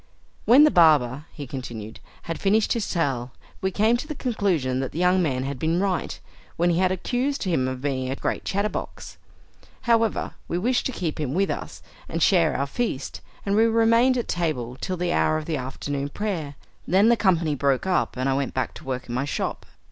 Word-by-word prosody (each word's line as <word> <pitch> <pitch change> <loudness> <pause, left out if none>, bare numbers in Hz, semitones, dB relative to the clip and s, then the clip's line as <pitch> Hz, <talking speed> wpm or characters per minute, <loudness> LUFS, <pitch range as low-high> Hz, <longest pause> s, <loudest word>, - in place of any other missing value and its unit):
"When 255 +6 +7
the 305 - +6
barber," 150 -5 +4
he 145 - -7
continued, 120 -5 -7 0.2
"had 165 - -5
finished 210 +2 +2
his 230 -4 -2
tale, 130 -8 -1 0.3
we 190 - +1
came 215 +5 +2
to 275 - -6
the 305 - -5
conclusion 185 - 0
that 135 -1 -3
the - - -6
young 180 +1 +3
man 130 -6 0
had 135 -1 -4
been 165 +4 +1
right, 190 -3 -1 0.4
when 175 +1 +3
he 170 - +1
had 185 0 +3
accused 250 +9 -1
him 165 -10 +1
of 130 0 -5
being 130 -3 -1
a 135 - -2
great - - -3
chatter 200 +2 0
box. - - -7 0.6
However, 230 -3 +1
we 170 - -2
wished 245 +7 +1
to - - -4
keep 170 -10 -3
him 145 -1 -2
with 195 -3 +1
us, - - -6 0.3
and 165 0 0
share 170 -5 +4
our 140 - 0
feast, 145 - -3 0.2
and 200 0 +1
we 220 +2 +5
remained 230 +3 +4
at 240 - -2
table 140 -9 -2
till 185 -1 -2
the 175 0 -1
hour 155 - +2
of 155 - -6
afternoon 140 -1 -3
prayer. 165 -6 -3 0.3
Then 195 +6 +4
the 235 - +6
company 175 -8 +2
broke 140 0 +1
up, 185 -7 0
and 130 +1 0
I 135 - +2
went 135 0 -2
back 130 - -1
to - - -12
work 130 -2 -4
in 120 - -5
my 130 +3 -1
shop. 145 - -3
165 Hz, 210 wpm, -24 LUFS, 135-205 Hz, 0.6 s, When